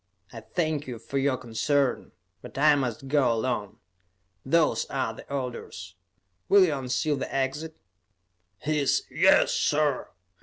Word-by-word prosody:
I 115 - -7
thank 155 - -2
you 125 -2 -5
for 135 +4 -3
your 135 -1 +1
concern, 130 +3 -1 0.3
but - - -11
I 150 +2 +6
must 135 -2 -2
go 140 -3 +3
alone. 110 -3 -2 0.7
Those 160 +4 +2
are - - -2
the - - -13
orders. 120 -9 -5 0.6
Will 200 -2 +7
you 160 - 0
unseal 135 +3 -1
the - - -5
exit?" 140 +4 -2 0.8
His 150 +1 0
"Yes, - - +4
sir!" 145 -2 +1
135 Hz, 130 wpm, -26 LUFS, 125-150 Hz, 0.8 s, Will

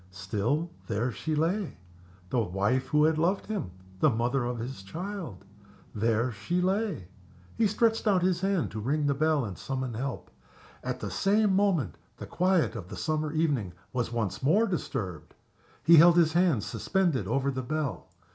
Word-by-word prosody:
Still, 105 - -2 0.2
there 115 +3 -1
she 155 +6 -3
lay 175 +5 -1 0.5
the 125 - +2
wife 105 +6 0
who 150 0 +3
had 155 0 +3
loved 180 +5 +1
him, 205 - -3 0.3
the 155 - +5
mother 120 +2 0
of 120 0 -2
his 120 -1 -6
child 160 - -6 0.5
there 115 +3 +1
she 170 - -2
lay. 185 - -1 0.5
He 225 - +3
stretched 225 +2 +1
out 190 -4 +3
his 180 -1 +1
hand 195 -3 0
to 110 - -5
ring 145 +7 0
the 140 - +2
bell 155 -1 +1
and 100 -3 -6
summon 130 +1 -4
help. 130 +4 -5 0.5
At - - -4
the - - -4
same 205 0 +2
moment 180 - +1 0.2
the - - -7
quiet 180 -6 +1
of 95 -6 -6
the - - -8
summer 155 -1 -1
evening 145 - 0 0.2
was 120 -2 -1
once 105 -4 -2
more 190 +12 +4
disturbed. 115 - -4 0.5
He 170 0 +7
held 170 +2 +8
his 160 -2 +4
hand 170 - +3
suspended 170 - 0
over 135 +5 +1
the 130 -1 -3
bell. 140 - -3
145 Hz, 170 wpm, -28 LUFS, 115-175 Hz, 0.5 s, held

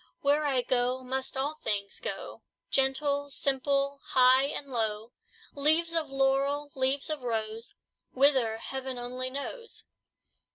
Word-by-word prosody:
Where 290 +2 +2
I 260 -3 +2
go, 250 +1 0
must 265 +1 -3
all 290 +3 -2
things 200 -2 -2
go, - - -5 0.3
Gentle, 280 +1 +2
simple, 275 +1 0
high 260 +1 +5
and 280 0 -4
low: 220 -1 -2 0.4
Leaves 315 +4 +2
of 320 -3 0
laurel, 275 +2 +1
leaves 265 +3 0
of 305 -3 -3
rose; 225 -1 -3 0.4
Whither, 260 -5 +3
heaven 265 +1 -5
only 250 +1 -4
knows!" 370 - -7
270 Hz, 125 wpm, -29 LUFS, 250-285 Hz, 0.4 s, high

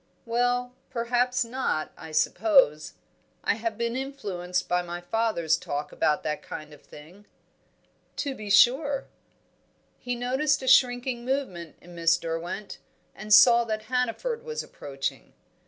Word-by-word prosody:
"Well, 245 +1 0 0.2
perhaps 245 +1 0
not. 230 -10 -2
I 160 - -10
suppose 155 - +3 0.5
I - - +2
have 225 0 -4
been 235 0 -2
influenced 185 -10 -3
by 180 0 +1
my 175 0 -6
father's 175 -5 0
talk 145 -1 -4
about 150 - 0
that 150 -1 -3
kind 155 -1 -9
of 145 - -15
thing." 175 +8 -15 0.9
"To 280 -2 -2
be 215 -5 -8
sure." 270 +7 +4 0.9
He 245 0 -3
noticed 265 +4 0
a - - -5
shrinking 245 -1 +3
movement 240 - -3
in 175 - -14
Miss 165 0 +3
Derwent 165 +5 -5 0.3
and 210 +1 -9
saw 235 +3 +8
that 215 -1 -3
Hannaford 350 - -1
was 470 -1 -4
approaching. 135 - -6
230 Hz, 135 wpm, -26 LUFS, 170-250 Hz, 0.9 s, saw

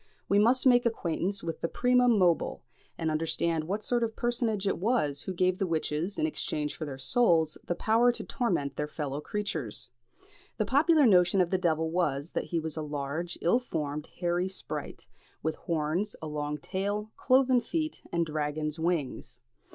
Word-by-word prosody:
We 200 - +4
must 245 +5 +4
make 245 -2 +6
acquaintance 195 -2 -2
with 165 -1 -4
the - - 0
primum 250 +2 +3
mobile, 175 -4 +2 0.3
and 160 -1 -1
understand 165 0 0
what 205 +5 -3
sort 240 +2 +1
of 230 - +1
a - - -19
personage 230 -4 -1
it 195 - 0
was 180 - +1
who - - -4
gave 185 0 +1
the 195 - 0
witches, 165 +3 -1
in 315 - +1
exchange 150 - -2
for 155 - -5
their 140 -3 -6
souls, 165 - +3
the 175 - -1
power 230 +6 +3
to - - -3
torment 170 - -1
their 150 - -1
fellow 145 -2 -4
creatures. 155 - -3 0.7
The 215 - +1
popular 295 +5 +4
notion 185 -3 +5
of 180 -2 +2
the 185 - +2
devil 160 -2 +1
was, 155 -3 -1
that - - -2
he 170 - -1
was 160 -1 -5
a 160 - -3
large, 150 +3 -4
ill 180 +9 +3
formed, 150 - -4
hairy 175 +1 0
sprite, 190 - -6 0.4
with 160 +1 0
horns, 165 +6 -2
a - - -7
long 150 -1 -3
tail, 205 +7 -3
cloven 255 -1 +4
feet, 315 +5 -3
and 170 -1 +1
dragon's 150 0 -2
wings. 165 -5 -2
175 Hz, 180 wpm, -29 LUFS, 155-220 Hz, 0.7 s, make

